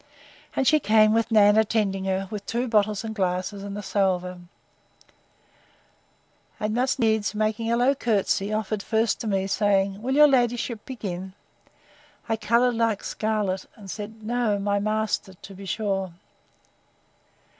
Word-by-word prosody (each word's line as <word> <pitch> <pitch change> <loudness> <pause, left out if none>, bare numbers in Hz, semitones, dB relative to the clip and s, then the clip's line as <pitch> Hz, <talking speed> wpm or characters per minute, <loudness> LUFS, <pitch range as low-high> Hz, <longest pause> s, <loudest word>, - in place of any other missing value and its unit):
And 270 - +1
she 310 - +5
came, 215 -3 +4
with 225 0 +1
Nan 210 -2 +5
attending 205 -3 0
her, 190 0 -1
with 210 -2 -6
two 240 +2 -1
bottles 215 -2 +1
and 220 -1 -4
glasses, 185 0 -2
and 200 0 -6
a 205 - -6
salver; 185 -2 -1 2.2
and 215 -1 -1
must 255 +3 +1
needs, 220 -3 +1
making 215 +2 -1
a 235 - +2
low 250 +3 +3
courtesy, 210 -5 0
offered 215 -1 -2
first 220 +2 0
to 225 - -4
me; 195 -2 0
saying, 195 0 +1
Will 260 +3 -1
your 300 +1 +8
ladyship 240 -4 0
begin? 190 -7 -6 0.9
I 225 - +1
coloured 235 +3 +2
like 230 -3 0
scarlet, 210 -3 -2
and 200 -4 -9
said, 220 +1 -8
No;—my 210 -3 0
master, 215 -2 -1
to 195 - -12
be 195 +1 -10
sure! 195 -3 -2
215 Hz, 145 wpm, -25 LUFS, 195-225 Hz, 2.2 s, your